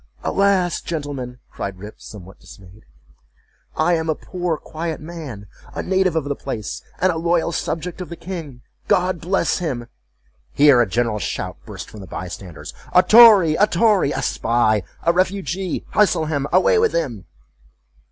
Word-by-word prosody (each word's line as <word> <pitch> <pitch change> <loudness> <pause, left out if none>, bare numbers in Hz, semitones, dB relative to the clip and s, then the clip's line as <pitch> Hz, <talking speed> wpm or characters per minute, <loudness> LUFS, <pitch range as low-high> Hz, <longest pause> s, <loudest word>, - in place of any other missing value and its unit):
—"Alas! 195 -3 +1
gentlemen," 140 -6 -5
cried 100 -1 -5
Rip, 105 +3 -11
somewhat 95 -3 -12
dismayed, 95 +2 -16 0.9
"I 165 +3 +3
am 160 -1 -1
a 155 - +1
poor 175 -2 -3
quiet 160 +1 -5
man, 150 -10 -8 0.3
a - - -3
native 190 -2 +1
of 160 - +1
the 140 0 -3
place, 110 -7 -5 0.2
and 185 - +3
a 165 - -3
loyal 170 0 +1
subject 170 +2 -4
of 180 - -7
the 170 - -6
king, 160 -9 -8 0.2
God 180 -1 +1
bless 190 +3 0
him!"Here 120 - 0
a 115 - +1
general 115 0 0
shout - - -4
burst - - -8
from 110 - -12
the 95 - -10
by 90 +1 -6
standers—"A 95 - -2
tory! 210 -5 +8
a 210 +6 +3
tory! 200 -6 +3
a - - -3
spy! 115 -2 +1 0.2
a 170 - +3
refugee! 185 0 -1
hustle 185 -6 +3
him! 145 -3 -2
away 190 - +4
with 455 0 +2
him!" 120 - -2
160 Hz, 155 wpm, -21 LUFS, 115-180 Hz, 0.9 s, tory